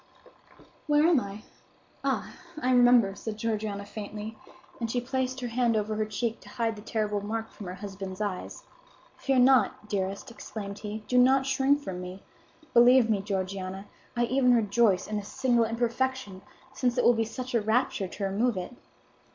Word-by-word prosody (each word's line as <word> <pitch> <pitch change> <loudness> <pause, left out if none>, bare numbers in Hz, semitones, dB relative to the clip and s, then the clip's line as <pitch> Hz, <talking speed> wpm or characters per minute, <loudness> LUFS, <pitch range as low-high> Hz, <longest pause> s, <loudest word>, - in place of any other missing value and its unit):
"Where 295 0 +4
am 335 -4 +5
I? 200 -1 -7 0.6
Ah, - - -1 0.3
I 255 -3 +1
remember," 245 -5 +5
said 215 +1 -6
Georgiana, 215 -2 -2
faintly; 210 +1 -7 0.4
and 230 -2 -2
she 245 - 0
placed 260 +1 -2
her 245 - -3
hand 230 -1 +2
over 215 0 -1
her 215 0 -1
cheek 225 +2 -2
to - - -15
hide 225 -1 -1
the 210 - -10
terrible 210 -2 -1
mark 225 +2 -4
from 200 - -9
her 180 - -5
husband's 195 -1 -7
eyes. 205 - -4 0.5
"Fear 270 -1 0
not, 245 -5 +4
dearest!" 200 +5 -3
exclaimed 205 -3 -7
he. 210 0 -6
"Do 250 +2 +3
not 265 +2 +5
shrink 270 +2 +2
from 185 -8 -5
me! 180 +2 -8 0.5
Believe 240 -1 +6
me, 205 -2 +1
Georgiana, 190 -1 -4 0.3
I 240 - +3
even 250 0 +3
rejoice 210 -3 +3
in 215 - -3
this 205 -1 -5
single 240 -3 +2
imperfection, 235 -2 -2 0.3
since 250 -1 0
it 245 - +3
will 240 - +6
be 225 -1 +1
such 250 +3 -6
a 230 - +3
rapture 220 -2 +1
to 200 - -7
remove 205 +3 +1
it." 185 +7 -5
225 Hz, 175 wpm, -28 LUFS, 200-245 Hz, 0.6 s, Believe